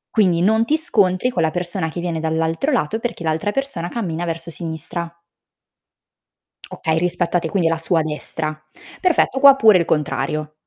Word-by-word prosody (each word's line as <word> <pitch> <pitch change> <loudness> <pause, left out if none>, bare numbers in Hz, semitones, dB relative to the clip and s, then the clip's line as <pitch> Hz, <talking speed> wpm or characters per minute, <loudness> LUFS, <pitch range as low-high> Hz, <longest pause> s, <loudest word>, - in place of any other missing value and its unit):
Quindi, 180 -6 +3
non 220 +4 +3
ti 300 +7 +1
scontri 235 - +1
con 175 - -1
la 160 - +2
persona 175 0 -3
che 165 - -6
viene 170 -2 -2
dall'altro 160 - -1
lato, 220 - 0
perché 230 -7 -4
l'altra 160 +5 -1
persona 210 -8 -3
cammina 175 -7 -3
verso 165 0 -4
sinistra. 165 +1 -4 1.6
Okay, 160 0 -2
rispetto 175 0 0
a - - +1
te 165 - -4
quindi 175 -1 +1
alla 165 0 +1
sua 165 +1 0
destra. 155 0 -4 0.4
Perfetto 335 -7 +2
qua 275 0 +8
pure 220 -7 +6
il 170 - 0
contrario. 155 0 -1
175 Hz, 170 wpm, -20 LUFS, 160-220 Hz, 1.6 s, qua